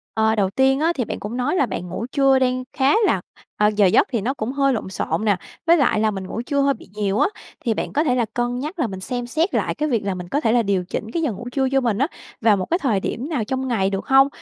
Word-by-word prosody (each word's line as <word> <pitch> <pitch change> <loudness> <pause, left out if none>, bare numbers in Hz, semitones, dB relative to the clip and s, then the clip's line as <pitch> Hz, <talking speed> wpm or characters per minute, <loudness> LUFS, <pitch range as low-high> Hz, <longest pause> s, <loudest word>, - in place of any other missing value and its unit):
Ờ, 220 0 +3
đầu 195 -3 +1
tiên 265 +5 +2
á, 325 +3 +2
thì 245 - -1
bạn - - -5
cũng 220 +4 -5
nói 255 +7 0
là 285 - +3
bạn 180 -6 -5
ngủ 225 - -4
trưa 275 -2 +4
đang 255 0 +1
khá 270 +2 +3
là - - +2 0.4
ờ, 210 - +4
giờ 205 -1 +5
giấc 185 - +4
thì 235 -5 0
nó 250 +6 -1
cũng 245 -3 -3
hơi 275 -1 +2
lộn 215 -5 -3
xộn 200 +3 -2
nè, 205 -3 +3 0.3
với 340 +1 +6
lại 240 -7 +2
là 220 0 +2
mình 190 -2 -5
ngủ 225 - -4
trưa 280 +1 +1
hơi 275 0 +3
bị 225 - -15
nhiều 205 -1 0
á, - - +4 0.4
thì 230 - +2
bạn - - -4
có 300 - +2
thể 255 -6 +1
là 240 -2 +1
cân 245 0 -1
nhắc 310 +7 -5
là 255 - +1
mình 190 -2 -6
xem 245 +3 -4
xét 320 +9 0
lại - - 0
cái 305 0 -1
việc 230 -6 0
là 195 - 0
mình 180 -1 -7
có 285 +8 0
thể 225 - +2
là 240 +1 +4
điều 195 -3 0
chỉnh 215 +2 -4
cái 335 - -1
giờ 305 -6 0
ngủ 230 +5 -8
trưa 265 0 +1
cho 270 0 +2
mình 230 -5 0
á, 275 - +2 0.3
vào 220 -3 +4
một 185 - -2
cái 345 - 0
thời 230 - +1
điểm 250 +8 -4
nào 285 -9 -1
trong 260 +4 -2
ngày 205 -6 +1
được 195 0 -3
hông? 270 0 +6
245 Hz, 305 wpm, -22 LUFS, 210-275 Hz, 0.4 s, với